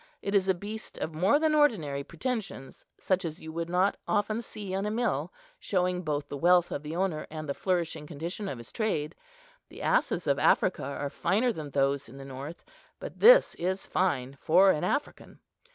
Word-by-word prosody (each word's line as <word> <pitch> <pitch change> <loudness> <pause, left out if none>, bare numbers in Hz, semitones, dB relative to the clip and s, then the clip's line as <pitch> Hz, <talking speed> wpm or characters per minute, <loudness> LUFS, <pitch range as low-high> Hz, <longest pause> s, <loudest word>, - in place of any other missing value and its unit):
It 200 - -2
is 195 -2 +3
a 190 - +3
beast 210 +4 -7
of 160 - -4
more 185 - +3
than 310 0 +2
ordinary 175 - +2
pretensions, 190 - -5
such 185 0 0
as 165 -1 -5
you 160 - -8
would 165 +1 -4
not 185 +3 +2
often 215 +2 0
see 205 -4 -7
in 195 +2 -1
a - - 0
mill, 235 +3 -1 0.3
showing 180 -2 0
both 150 -3 -2
the 145 - -6
wealth 175 +1 +4
of 140 - -3
the 155 +2 -6
owner 180 -4 -1
and 155 -1 -6
the 140 - -1
flourishing 170 -4 -2
condition 170 +7 -5
of 135 - -5
his 115 -1 -12
trade. 165 -9 -1 0.6
The - - -10
asses 340 - +1
of 140 -1 +1
Africa 185 - +3
are 140 0 -4
finer 210 - +1
than 155 -6 -6
those 140 0 0
in 135 - -12
the 135 - -9
north; 135 +5 -8 0.3
but - - -8
this - - +7
is 185 +2 -1
fine 140 -7 -1
for 185 +4 +6
an 150 - -1
African. 280 +10 -3
175 Hz, 195 wpm, -29 LUFS, 150-200 Hz, 0.6 s, this